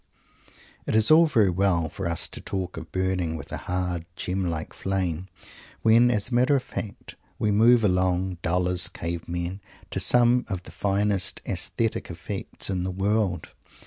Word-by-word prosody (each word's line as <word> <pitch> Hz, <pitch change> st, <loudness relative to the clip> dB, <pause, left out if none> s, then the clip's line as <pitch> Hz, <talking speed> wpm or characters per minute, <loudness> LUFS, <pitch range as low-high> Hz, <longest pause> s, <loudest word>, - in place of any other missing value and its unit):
It -, -, 0 dB
is 110 Hz, +3 st, +6 dB
all 165 Hz, +1 st, +7 dB
very 110 Hz, -10 st, +3 dB
well 90 Hz, -3 st, +1 dB
for 80 Hz, -, -5 dB
us 85 Hz, -1 st, 0 dB
to -, -, -6 dB
talk 95 Hz, -2 st, -4 dB
of 80 Hz, 0 st, -9 dB
"burning 95 Hz, -3 st, -1 dB
with -, -, -10 dB
a -, -, -3 dB
hard 90 Hz, -2 st, -1 dB
gem 95 Hz, +1 st, -2 dB
like 80 Hz, -3 st, -3 dB
flame," 95 Hz, -2 st, -2 dB, 0.6 s
when, 115 Hz, +2 st, +5 dB
as 105 Hz, -2 st, 0 dB
a -, -, -6 dB
matter 125 Hz, +4 st, +4 dB
of 130 Hz, -, 0 dB
fact, 105 Hz, -4 st, -7 dB, 0.2 s
we 105 Hz, -, +1 dB
move 115 Hz, +3 st, +5 dB
along, 90 Hz, -1 st, +1 dB
dull 90 Hz, +2 st, +1 dB
as 90 Hz, 0 st, +2 dB
cave 85 Hz, -2 st, -5 dB
men, 85 Hz, +3 st, -4 dB, 0.3 s
to -, -, -2 dB
some 125 Hz, 0 st, +5 dB
of 95 Hz, -3 st, -4 dB
the -, -, -12 dB
finest 100 Hz, -1 st, 0 dB
aesthetic 115 Hz, -1 st, -2 dB
effects 90 Hz, +3 st, -5 dB
in 95 Hz, -2 st, -1 dB
the 95 Hz, -, -2 dB
world. 95 Hz, 0 st, -1 dB
95 Hz, 175 wpm, -25 LUFS, 90-105 Hz, 0.6 s, all